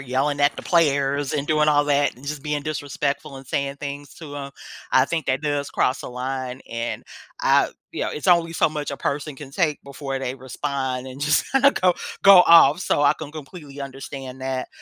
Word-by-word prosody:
yelling 140 +2 -1
at 145 +1 +3
the - - -7
players 140 -4 +2
and 145 -1 -1
doing 150 -1 +3
all 145 -1 +4
that 145 -2 +1
and 130 +3 -14
just 145 -1 -4
being 150 -1 -2
disrespectful 145 -1 -3
and 135 -1 -11
saying 140 +1 -2
things 140 -1 -7
to 145 -3 -9
'em. 140 -1 -6 0.4
I 130 - +5
think 165 -4 -3
that 130 0 +1
does 145 -1 -2
cross 125 -2 0
a - - -6
line. 130 +1 -4
And, 115 0 -4 0.4
I - - +4 0.2
you - - -3
know, - - -1
it's 150 - -5
only 170 -2 +4
so 165 - +2
much 150 -1 -4
a 140 - -4
person 145 0 -3
can 135 -1 -10
take 155 -3 0
before 140 -1 -5
they 130 -1 -3
respond 130 -1 -4
and 130 +2 -9
just 150 +1 +3
kinda 270 +1 +6
go 180 -7 +2 0.3
go 195 -2 +9
off, 165 -1 +7
so 145 - +1
I 145 - +5
can 150 -2 -8
completely 150 -2 -10
understand 135 -1 -7
that. 130 -1 -3
140 Hz, 205 wpm, -23 LUFS, 135-150 Hz, 0.4 s, go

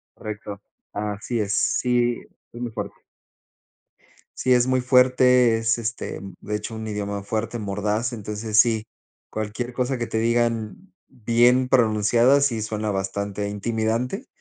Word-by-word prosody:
Correcto. 105 -1 -7 0.3
Así 105 +3 -3
es. 100 -1 -1
Sí, 120 -1 +1 0.3
es 120 - -8
muy 120 -2 -3
fuerte. 105 -3 -6 1.4
Sí, 130 0 +2
es 125 0 +3
muy 130 -1 +2
fuerte. 125 -2 +4
Es, 115 +1 +1
este, 115 +1 -4 0.2
de 105 - -3
hecho, 105 +2 -5
un 110 0 -5
idioma 100 -1 -3
fuerte, 110 +3 -3
mordaz. 105 +4 -1
Entonces, 105 0 -1
sí, 110 -2 +3 0.4
cualquier 110 +3 -4
cosa 125 +1 -1
que 120 - -2
te 110 - -1
digan 115 - -1
bien 125 +1 +3
pronunciada, 120 +2 +4
sí, 120 -6 +1
suena 105 0 -2
bastante 100 +1 -3
intimidante. 115 - -2
115 Hz, 135 wpm, -23 LUFS, 105-125 Hz, 1.4 s, fuerte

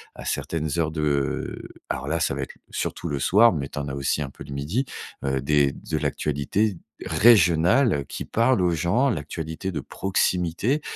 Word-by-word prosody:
à - - -9
certaines 80 -2 -2
heures 80 -2 +1
de 75 -3 -2 0.2
alors 65 +2 -3
là, 80 +3 0
ça 80 - +1
va 70 - -3
être 65 - -9
l - - -28
surtout - - -3
le 70 -2 -2
soir, 110 - +5
mais 70 -4 -3
tu - - -5
en 70 - -4
as 70 - -4
aussi 70 +2 0
un 70 - -3
peu - - -11
le 70 - -8
midi. 80 - -1 0.4
Heu 65 -1 0
des 70 0 +3
de - - -4
l'actualité 85 +8 0 0.3
régionale 95 - +4
qui - - -5
parle 115 -1 +2
aux 90 -1 +3
gens. 90 - +2
L'actualité 80 - -4
de 80 - -3
proximité 95 - 0
80 Hz, 185 wpm, -24 LUFS, 70-95 Hz, 0.4 s, soir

